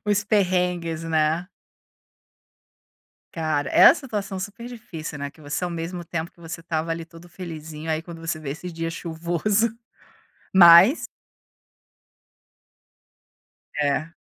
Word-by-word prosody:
Os 205 0 +1
perrengues, 180 -5 0
né. 160 +2 +1 1.9
Cara, 155 -3 -1
é - - +5
a - - +10
situação 210 - -5
super 225 +5 -7
difícil, 165 -11 -8
né, 140 0 -4
que 155 - -22
você 145 +4 -4
ao 180 - -1
mesmo 170 +1 -5
tempo 165 0 -4
que - - -27
você 165 0 -7
estava 165 -1 -3
ali 165 0 -3
todo 170 +1 -15
felizinho, 160 -3 -8
aí 155 - -1
quando 170 0 -10
você 165 -1 -3
vê 150 -3 -6
esses 170 +4 -6
dias 165 0 -3
chuvoso, 175 +7 -1 0.8
mas 180 - +8 2.7
É. 150 +2 0
170 Hz, 125 wpm, -24 LUFS, 160-180 Hz, 2.7 s, a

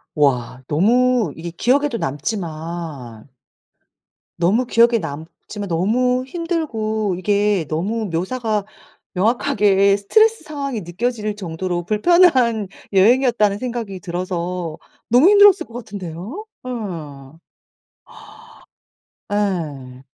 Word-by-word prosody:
와. 125 -4 +1
너무 230 - +2
이게 170 +1 -7
기억에도 260 - +1
남지만 155 - -5 1.1
너무 210 +9 +2
기억에 235 0 +4
남지만 165 +6 -7
너무 250 +9 +1
힘들고 230 - -2
이게 205 -2 +1
너무 205 +8 -2
묘사가 210 +3 -1 0.5
명확하게 200 -2 +2
'스트레스 435 - +3
상황이 280 -7 -4
느껴질 210 +4 -3
정도로 175 -2 -4
불편한 235 - +3 0.3
여행이었다.'는 215 0 +3
생각이 230 -5 -5
들어서 180 -2 -4 0.3
너무 255 - +6
힘들었을 405 -2 +6
것 230 - -17
같은데요. 205 - -7 0.2
예. 160 - -7 1.9
예. 150 -11 -3
205 Hz, 230 characters per minute, -20 LUFS, 170-245 Hz, 1.9 s, 너무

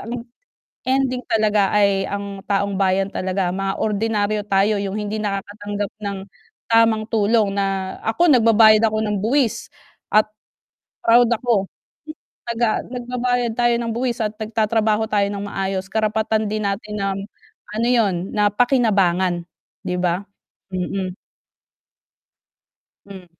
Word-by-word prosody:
ang 235 +1 -6 0.6
ending 260 -1 +1
talaga 215 -3 +2
ay 200 -1 +2
ang 200 -1 -5
taong 200 0 +1
bayan 195 0 +2
talaga, 185 -1 -1
mga 195 0 -2
ordinaryo 210 0 0
tayo, 200 +2 +3
'yung 200 +1 -3
hindi 210 0 -3
nakakatanggap 205 0 -4
ng 200 -1 -3 0.5
tamang 225 -1 +4
tulong 215 -2 +2
na 195 -1 -2
ako 320 +9 +3
nagbabayad 225 -2 +6
ako 215 0 -1
ng 210 -1 -1
buwis 235 0 0 0.4
at 215 0 +6 0.8
proud 235 +1 +6
ako. 230 -4 +1 0.8
Taga 235 -2 0
nagbabayad 245 -1 -2
tayo 240 0 +3
ng 235 - -3
buwis 240 0 -2
at 210 0 -3
nagtatrabaho 220 0 0
tayo 205 -2 +2
ng 200 0 -4
maayos 195 -1 -3
karapatan 220 +1 0
din 215 0 -2
natin 210 +2 -4
ng 195 0 -1 0.6
ano 230 +2 +1
'yun, 225 -6 +3 0.2
na 210 -1 +2
pakinabangan 195 -8 +2 0.4
'di 180 - -2
ba? 180 +1 0 0.5
Mm. 185 0 -3 1.9
Hmm. 190 -2 -10
210 Hz, 125 wpm, -21 LUFS, 195-230 Hz, 1.9 s, nagbabayad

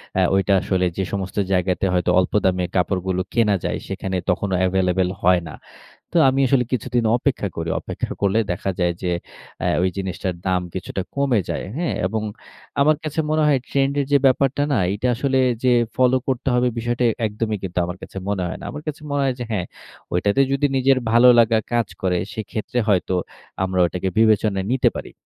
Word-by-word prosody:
অ্যা 95 - +3
ঐটা 95 +1 +2
আসলে 95 -2 0
যে 95 - 0
সমস্ত 95 0 -4
জায়গাতে, 90 0 +1
হয়তো 90 0 +1
অল্প 90 - -1
দামে 90 -1 +2
কাপড়গুলো 95 0 0
কেনা 110 -4 +3
যায়, - - -1
সেখানে 95 -1 -3
তখনো 95 +1 0
এভেইলেবল 90 0 +1
হয় 90 0 +4
না। 80 - -8 0.6
তো - - -2
আমি 135 +1 +1
আসলে 125 -1 +3
কিছুদিন 125 -1 0
অপেক্ষা 120 -5 -1
করি। 80 0 -3
অপেক্ষা - - -5
করলে 100 +2 +2
দেখা 95 +2 -2
যায় 85 0 +2
যে, 90 - 0 0.5
অ্যা - - 0
ওই 95 - +3
জিনিসটার 95 -1 -3
দাম 90 -1 +2
কিছুটা 95 0 -4
কমে 135 -6 +2
যায়। - - -3
হ্যা? 170 0 -1 0.2
এবং 110 +2 -2 0.6
আমার 150 +2 +4
কাছে 155 +1 -1
মনে 155 0 +2
হয় 140 -3 +4
ট্রেন্ড 135 0 +1
এর 140 - -1
যে 140 - +6
ব্যাপারটা 135 +2 +2
না? 130 - +2
এটা 110 +5 -1
আসলে 135 +1 +1 0.3
যে 125 - +5 0.2
ফলো 130 0 +4
করতে 130 +1 -1
হবে, 125 0 +3
বিষয়টা 120 +1 -1
এ - - 0
একদমই 105 0 -2
কিন্তু 90 -1 -4
আমার 90 +1 -5
কাছে - - -11
মনে 100 -3 -1
হয় - - -6
না। - - -9
আমার 150 - -7
কাছে 155 +1 -5
মনে 140 0 0
হয় 130 -2 +1
যে 120 - -3
হ্যাঁ, 90 -4 -1 0.5
ঐটাতে 100 +8 +1
যদি 140 +1 +2
নিজের 130 0 +3
ভালো 120 +2 +6
লাগা 115 -1 +5
কাজ 120 -3 +1
করে, 90 -2 +1 0.2
সেক্ষেত্রে 110 +2 -4
হয়তো 95 -2 +2 0.5
আমরা 95 -1 -1
ওটাকে 90 +2 -3
বিবেচনায় 110 -2 +5 0.3
নিতে 130 - +3
পারি। - - -7
105 Hz, 190 wpm, -21 LUFS, 95-130 Hz, 0.6 s, যে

